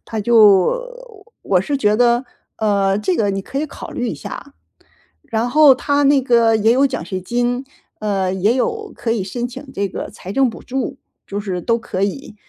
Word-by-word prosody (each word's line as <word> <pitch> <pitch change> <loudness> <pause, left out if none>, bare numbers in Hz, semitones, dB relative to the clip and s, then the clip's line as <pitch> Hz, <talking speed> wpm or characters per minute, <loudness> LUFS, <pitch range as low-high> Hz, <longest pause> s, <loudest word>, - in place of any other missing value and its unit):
它 220 -2 -4
就 225 - +4 0.5
我 185 -2 +2
是 285 +8 -2
觉 210 -4 +2
得， 240 +1 +3 0.3
呃， 200 -2 +1
这 190 -4 0
个 205 -3 +1
你 195 0 -3
可 270 - -5
以 310 - -1
考 - - -9
虑 245 - -3
一 - - -3
下。 285 - -9 0.8
然 230 +2 0
后 295 -1 +7
它 285 +2 0
那 275 -1 +4
个 235 -3 +4
也 220 +2 +3
有 270 +3 +4
奖 260 -1 -4
学 185 -1 -4
金， 245 +5 -1 0.4
呃， 195 -3 -1
也 200 +5 +1
有 435 - -2
可 230 - -3
以 220 - -1
申 240 +6 -4
请 260 +3 -9
这 200 0 -1
个 - - -6
财 190 - -9
政 270 +1 +3
补 - - -9
助， 265 +1 -3 0.3
就 200 - -4
是 190 -4 -3
都 230 +5 +1
可 195 -4 -4
以。 215 +4 -3
230 Hz, 210 characters per minute, -19 LUFS, 200-265 Hz, 0.8 s, 后